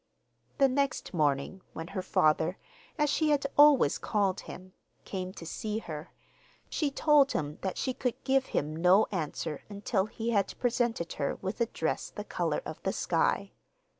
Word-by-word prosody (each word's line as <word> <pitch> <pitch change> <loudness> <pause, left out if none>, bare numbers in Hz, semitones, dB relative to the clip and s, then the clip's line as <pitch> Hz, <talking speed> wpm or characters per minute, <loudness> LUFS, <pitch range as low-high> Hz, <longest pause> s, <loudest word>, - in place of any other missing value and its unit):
The 275 - +6
next 270 -6 -1
morning, 150 +3 0
when 165 +1 -6
her 195 -2 -3
father 160 +1 +2 0.4
(as 300 -1 +3
she 310 +2 +2
had 285 -2 +2
always 290 - +6
called 200 -3 0
him) 185 0 -10 0.3
came 185 -1 -4
to 170 - -9
see 210 +5 -3
her, 155 -8 -7 0.6
she 300 - 0
told 285 -1 +4
him 150 0 -3
that 190 -2 -3
she 260 - -1
could 250 -1 -1
give 265 0 +2
him 150 +2 -1
no 180 +6 +5
answer 160 -4 -3
until 205 0 -1
he 230 +1 -3
had 200 -4 0
presented 235 -7 0
her 140 - 0
with 190 +5 -5
a 235 - +3
dress - - -2
the - - -7
colour - - -2
of - - -7
the - - -1
sky. - - 0
200 Hz, 165 wpm, -30 LUFS, 170-260 Hz, 0.6 s, The